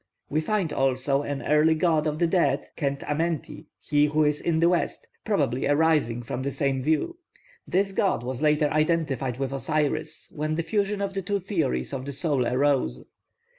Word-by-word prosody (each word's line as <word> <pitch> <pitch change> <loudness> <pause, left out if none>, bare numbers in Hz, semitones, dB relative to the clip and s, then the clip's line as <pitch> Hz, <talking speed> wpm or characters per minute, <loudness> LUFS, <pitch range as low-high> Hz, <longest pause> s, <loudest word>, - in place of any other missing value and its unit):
We 155 - +1
find 185 -1 -1
also 135 +1 +1
an 145 -1 -4
early 150 +2 +4
god 160 -1 +2
of 150 0 -1
the 170 - +2
dead, 145 -5 +1
Khent 140 -2 -2
amenti, 155 0 -3
'he 145 0 +2
who 155 +1 +2
is 150 0 +1
in 165 -2 +1
the 165 - +4
west,' 175 - -1 0.2
probably 125 +2 0
arising 145 -6 +2
from 120 +2 -4
this 140 +1 -4
same 135 -2 0
view. 160 - 0 0.5
This 195 +2 +1
god 190 - 0
was 125 +1 -4
later 150 0 +3
identified 150 -6 0
with 135 0 -2
Osiris 150 +2 -2
when 155 0 -2
the 165 - -1
fusion 205 +1 -1
of 195 -1 -3
the 195 - -2
two 200 +2 -1
theories 170 - -2
of 130 -1 -4
the 140 - -4
soul 140 -3 0
arose. 130 - +1
150 Hz, 180 wpm, -26 LUFS, 135-165 Hz, 0.5 s, early